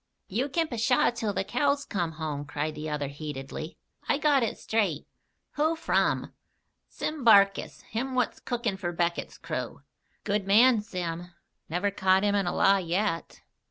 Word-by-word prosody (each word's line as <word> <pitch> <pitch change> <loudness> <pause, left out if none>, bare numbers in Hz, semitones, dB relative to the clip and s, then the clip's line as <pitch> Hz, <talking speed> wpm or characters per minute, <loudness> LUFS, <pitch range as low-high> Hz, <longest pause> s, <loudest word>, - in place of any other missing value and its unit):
"You 245 +9 -1
kin 325 +3 0
'pshaw' 240 -1 +2
till 225 -3 -2
the 195 - -1
cows 280 +6 0
come 175 -5 -2
home," 155 -2 -4
cried 150 +2 -3
the 155 +1 -5
other 150 -2 -2
heatedly. 145 +2 -7 0.3
"I - - +3
got 290 -2 +3
it 230 - -1
straight." 200 -10 -1 0.5
"Who 315 +2 +2
from?" 325 - 0 0.5
"Sim 305 -3 -4
Barkis, 200 -4 +4
him 255 +4 -4
what's 250 - 0
cookin' 235 -5 -2
for 175 -2 -3
Beckett's 170 0 -2
crew." 145 -4 -5 0.4
"Good 205 -1 -1
man, 225 +3 +6
Sim. 175 -5 -4 0.4
Never 180 +5 0
caught 190 0 +3
him 205 -1 +2
in 200 -3 +1
a - - -1
lie 195 0 +5
yet. 175 0 -2
195 Hz, 160 wpm, -28 LUFS, 165-240 Hz, 0.5 s, man